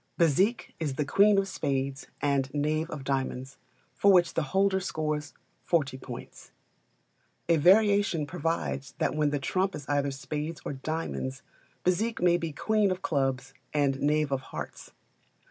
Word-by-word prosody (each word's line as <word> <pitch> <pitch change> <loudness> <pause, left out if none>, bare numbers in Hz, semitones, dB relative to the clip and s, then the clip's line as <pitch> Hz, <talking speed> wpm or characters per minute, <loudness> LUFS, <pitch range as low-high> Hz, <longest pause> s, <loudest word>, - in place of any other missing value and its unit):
Bezique 185 - +2
is 150 -5 -2
the 150 - -1
queen 200 +7 +5
of 195 0 +2
spades 140 -6 -2 0.2
and 140 -2 +1
knave 155 +2 0
of 150 -5 -6
diamonds, 135 -1 -3 0.3
for 200 - +4
which 175 -2 +4
the - - +1
holder 195 0 +2
scores 155 -4 -2 0.3
40 140 -6 +1
points. 125 -2 -9 1.0
A 165 -1 +4
variation 200 -1 +4
provides 165 -4 -3
that - - 0
when 150 -1 +2
the 145 - 0
trump 185 +7 0
is 145 - -8
either 145 -1 +1
spades 150 +4 -4
or - - -3
diamonds, 135 -2 -4 0.4
Bezique 215 +6 +1
may 175 -1 +4
be 165 -2 -3
queen 215 +6 +1
of 185 0 -3
clubs 135 -2 -1 0.2
and 140 -2 +2
knave 150 0 +2
of 135 -1 0
hearts. - - -8
150 Hz, 150 wpm, -28 LUFS, 140-180 Hz, 1.0 s, queen